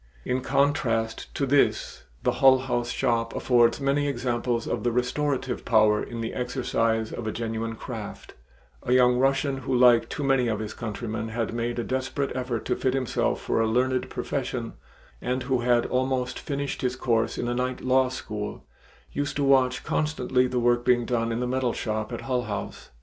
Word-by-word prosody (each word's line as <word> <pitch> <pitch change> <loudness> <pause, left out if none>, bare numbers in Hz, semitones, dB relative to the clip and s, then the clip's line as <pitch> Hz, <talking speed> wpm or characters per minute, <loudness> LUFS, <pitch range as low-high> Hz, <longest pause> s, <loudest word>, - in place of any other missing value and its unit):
In 125 +1 0
contrast 125 -5 0
to 140 - 0
this 140 +1 +1 0.2
the - - +3
Hull 135 -1 +8
House 120 -2 -2
shop 115 -1 0
affords 120 -1 +3
many 140 +1 +1
examples 120 -2 -1
of - - -2
the 120 - +1
restorative 130 +2 -1
power 110 -3 +4
in 115 -1 -5
the 115 - -3
exercise 115 -3 0
of 115 - -5
a - - 0
genuine 115 0 -3
craft; - - -8 0.5
a 125 - 0
young 125 -1 +5
Russian 135 +1 +2
who, 130 0 -2
like 120 -2 +5
too 145 - -4
many 135 -3 +3
of 110 -2 0
his 110 0 -5
countrymen, 110 0 -4
had 115 +1 -3
made 120 +1 -2
a 120 - -1
desperate 130 +2 -2
effort 125 -3 -3
to - - 0
fit 130 0 0
himself 130 -3 0
for - - 0
a 115 - +2
learned 125 +3 +1
profession, - - -3 0.5
and 125 +1 -1
who 130 0 0
had 120 0 +2
almost 130 0 -1
finished 140 -1 -3
his 125 -1 0
course 115 -3 0
in 120 - -2
a 120 - 0
night 125 +1 -2
law 130 0 +3
school, 105 -4 -6 0.5
used 145 0 -2
to 145 - 0
watch 130 -2 +3
constantly 135 -4 +1
the 125 - -3
work 120 0 +2
being 120 -1 +3
done 115 -1 0
in 115 +2 -2
the - - 0
metal 130 -1 0
shop 110 0 -3
at 120 - -4
Hull 125 -2 -1
House. 105 - -6
125 Hz, 185 wpm, -26 LUFS, 115-130 Hz, 0.5 s, Hull